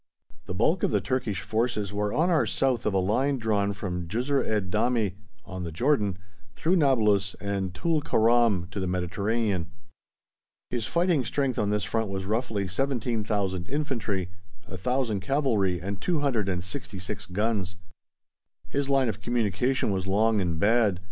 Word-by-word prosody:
The - - -4
bulk - - +2
of - - +2
the - - +2
Turkish 125 -8 -1
forces 110 -3 -1
were 105 0 0
on 170 - +2
or 160 - +3
south 125 -4 +1
of 105 - +1
a - - +4
line 130 +9 +1
drawn 105 -4 +1
from 90 -3 -4
Jisr 125 +9 0
ed 105 -4 -1
Damie, 110 -2 +1 0.3
on 90 -1 -6
the 85 - -4
Jordan, 105 - +1 0.4
through 180 +4 +2
Nablus 105 - +3
and 100 -2 -2
Tul 160 - +1
Keram 115 -7 +3
to 100 - -4
the 95 - -1
Mediterranean. 95 +1 -1 1.0
His 120 -1 -1
fighting 170 -4 +2
strength 130 +2 -1
on 105 - +1
this 105 0 0
front 110 -1 -1
was, 95 -1 -3
roughly, 110 -2 -1
17,000 105 -5 -1
Infantry, 115 - -2 0.3
1,000 110 +3 -1
Cavalry, 100 -6 +1
and 100 +2 -5
266 105 - -2
guns. 100 -1 -1 0.9
His 140 0 -1
line 135 -2 +3
of 110 - -3
communication 120 +1 0
was 95 -1 -2
long 105 +2 +3
and 85 -3 -1
bad. 105 -2 +3
105 Hz, 150 wpm, -27 LUFS, 95-125 Hz, 1.0 s, a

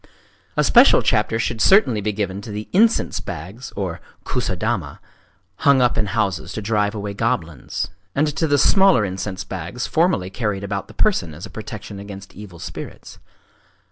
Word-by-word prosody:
A - - +4
special - - +6
chapter 110 - +2
should 115 0 -2
certainly 160 - +5
be 105 +1 0
given 100 -1 -3
to 105 - -9
the 105 +1 -5
incense 220 +4 +3
bags 95 - -7 0.5
(kusadama) 95 -5 -2 0.6
hung 140 -2 +4
up 125 -1 +3
in 105 - 0
houses 95 -5 -1
to 110 - -4
drive 105 0 +1
away 100 -1 -4
goblins,—and 100 - -2
to 160 - +1
the 145 -1 +3
smaller 190 - +5
incense 95 0 -4
bags 95 +6 -5
formerly 155 - +1
carried 105 -3 -2
about 100 -1 -3
the - - -15
person 85 - +1
as 85 +6 -8
a 100 - -11
protection 105 -1 -7
against 100 -1 -9
evil 100 -4 -11
spirits. - - -9
105 Hz, 155 wpm, -21 LUFS, 95-120 Hz, 0.6 s, special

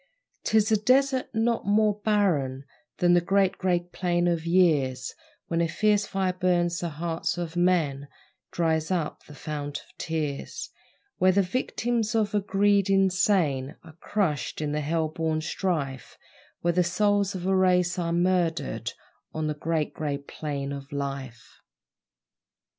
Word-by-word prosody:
'Tis 220 0 +3
a 215 - +5
desert 260 +4 +2
not 230 +1 0
more 210 0 +3
barren 150 -11 +1 0.3
Than 175 0 +4
the 175 - +5
Great 195 +1 +1
Grey 180 -2 +1
Plain 175 0 -1
of 170 -1 -1
years, 150 -8 +2 0.3
Where 170 0 0
a 170 - +2
fierce 205 +4 +1
fire 190 -1 0
burns 175 -1 +1
the 170 - -2
hearts 165 +3 -3
of 170 -1 -4
men 165 -6 +1 0.4
Dries 160 -2 0
up 175 -5 -2
the 150 - -12
fount 145 -1 -5
of - - -24
tears: 155 -4 -4 0.5
Where 185 0 +5
the 200 +1 +3
victims 230 +2 -1
of 215 -1 +1
a 210 - +3
greed 200 0 +2
insane 185 -8 +2
Are 160 - -13
crushed 165 -10 -1
in 150 -1 -2
a 150 - -1
hell 160 +2 0
born 160 0 -1
strife 155 -6 -3 0.4
Where 175 0 +1
the 180 +1 +3
souls 200 +2 +1
of 180 -1 -5
a 190 0 +2
race 180 -1 +3
are 170 -1 -1
murdered 170 - 0 0.4
On 155 0 -1
the 155 - 0
Great 155 0 -2
Grey 145 -2 -2
Plain 140 -1 -5
of 140 0 -7
Life! 135 -5 -6
175 Hz, 150 wpm, -26 LUFS, 155-195 Hz, 0.5 s, a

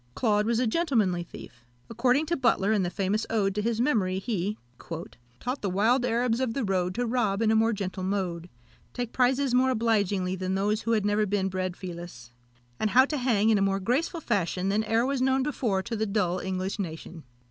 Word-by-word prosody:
Claude 210 -2 +1
was 235 -1 +1
a 255 - +2
gentlemanly 220 - +1
thief. 120 -7 -12 0.2
According 250 +6 +1
to 340 +2 0
Butler, 225 -7 +2
in 210 - +2
the 175 - 0
famous 195 +4 -1
ode 200 -3 +1
to 210 - -1
his 230 +1 -1
memory, 215 -9 +1
he 205 0 -2 0.8
"Taught 250 +3 -3
the 200 - -1
wild 225 +7 +2
Arabs 235 0 +1
of 255 -3 -1
the 275 - -1
road 185 -3 0
To 245 +1 0
rob 225 -5 0
in 225 -1 +2
a - - +3
more 225 +1 +3
gentle 195 -3 -4
mode; 185 -3 -2 0.4
Take 245 -2 -4
prizes 260 +1 +2
more 255 +1 +4
obligingly 205 -6 +1
than 185 0 -2
those 210 +3 0
Who 230 -1 +1
never 205 +1 +1
had 210 - 0
been 195 -1 0
bred 185 -1 -3
filous; 170 -10 -8 0.5
And 215 - +1
how 255 +6 +6
to 300 +1 -3
hang 225 -4 +2
in 210 - +3
a - - 0
more 195 0 +1
graceful 280 - -1
fashion 190 - -1
Than 210 +2 +1
e'er 225 +2 +2
was 270 -1 -1
known 265 0 +2
before 230 -9 -1
to 230 +2 -4
the 220 0 -1
dull 185 -3 0
English 190 +2 -3
nation." 165 -2 -6
210 Hz, 210 wpm, -27 LUFS, 190-245 Hz, 0.8 s, how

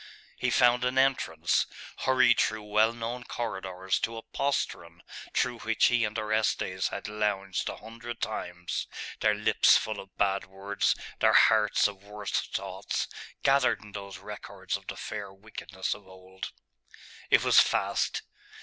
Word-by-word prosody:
He - - 0
found 125 0 +4
an 125 +1 0
entrance; 135 0 +2 0.3
hurried 130 -2 +4
through 110 -1 +1
well 105 +2 +3
known 120 +1 -5
corridors 95 -6 -3
to 115 0 -2
a 115 - -7
postern 85 -9 -2 0.3
through - - 0
which - - +3
he 120 -2 +3
and 105 +1 -4
Orestes 110 -4 0
had 100 - -5
lounged 105 -3 -1
a - - -5
hundred 115 +2 -8
times, 90 -5 -3 0.3
their 105 -1 +3
lips 105 - +5
full 110 -1 -3
of 95 - -12
bad 100 -1 +1
words, 100 +2 0 0.2
their - - +4
hearts 105 -2 +5
of 100 -1 -9
worse 105 0 -7
thoughts, 95 0 -2 0.4
gathered 135 -4 +3
in 105 - -13
those 100 -1 -7
records - - -6
of - - -8
the - - -5
fair 105 -2 -5
wickedness 95 -1 -5
of 100 -2 -13
old.... 95 0 -9 0.8
It - - +5
was - - +7
fast. - - +1
105 Hz, 150 wpm, -29 LUFS, 95-115 Hz, 0.8 s, was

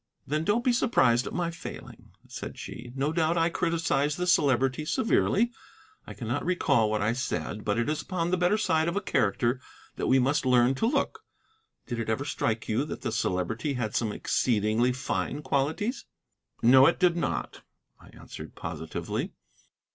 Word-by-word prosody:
"Then 155 +3 -1
don't 215 +7 +1
be 250 - +3
surprised 130 - +3
at - - -5
my 175 -1 -1
failing," 170 - -10 0.2
said - - -7
she. 120 +1 -8
"No 140 +3 0
doubt 165 0 +1
I 165 0 +3
criticised 160 -4 0
the 180 - -1
Celebrity 135 -5 +2
severely. 225 +6 +2 0.6
I - - -8
cannot 120 +3 -3
recall 140 -11 +2
what 105 -1 0
I 110 +2 +2
said. 115 -3 -3
But 105 0 0
it 120 - 0
is 155 0 -1
upon 175 -2 -2
the 185 - +2
better 180 +4 +2
side 160 -6 +1
of 170 - -1
a - - +2
character 120 - 0 0.4
that - - -1
we 130 - +5
must 140 +4 +2
learn 125 0 +4
to 180 +12 0
look. 275 +3 -1 0.6
Did 120 -3 -4
it 115 - -3
ever 130 +6 -1
strike 110 -4 -2
you 110 +5 +1
that - - -7
the - - -1
Celebrity 110 - -1
had 110 -4 -3
some 110 -3 0
exceedingly 110 +2 +1
fine 130 +3 -3
qualities?" 150 - -1 0.6
"No, 130 +3 +8
it 165 - +2
did 180 -2 +4
not," 170 - -3 0.4
I - - -17
answered - - -11
positively. - - -4
140 Hz, 175 wpm, -28 LUFS, 120-170 Hz, 0.6 s, No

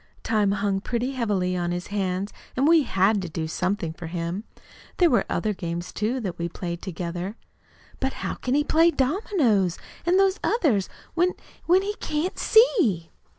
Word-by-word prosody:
Time 210 -3 +2
hung 200 -1 0
pretty 245 +4 -2
heavily 205 -8 0
on 175 -1 -1
his 175 0 -4
hands, 195 0 -1 0.2
and 270 +3 +3
we 330 0 +6
HAD 200 -4 +2
to 180 - -5
do 160 0 -3
something 180 0 -1
for 165 0 -8
him. 170 +5 -4 0.5
There 350 -4 +5
were 240 - +3
other 215 -1 0
games, 175 -2 -5
too, 230 +5 -1
that 185 -5 -4
we 170 0 -2
played 170 0 -5
together." 180 +2 -4 0.6
"But 265 0 -1
how - - -1
can 255 +1 -2
he 295 - +3
play 325 +3 +4
dominoes, 265 - +1 0.3
an' 350 +2 +3
those 390 0 +3
others, 265 - +2 0.2
when 355 +2 +2 0.3
when 365 +3 +5
he 410 +1 -2
can't 310 +5 -2
see?" 305 - +4
205 Hz, 170 wpm, -25 LUFS, 180-295 Hz, 0.6 s, we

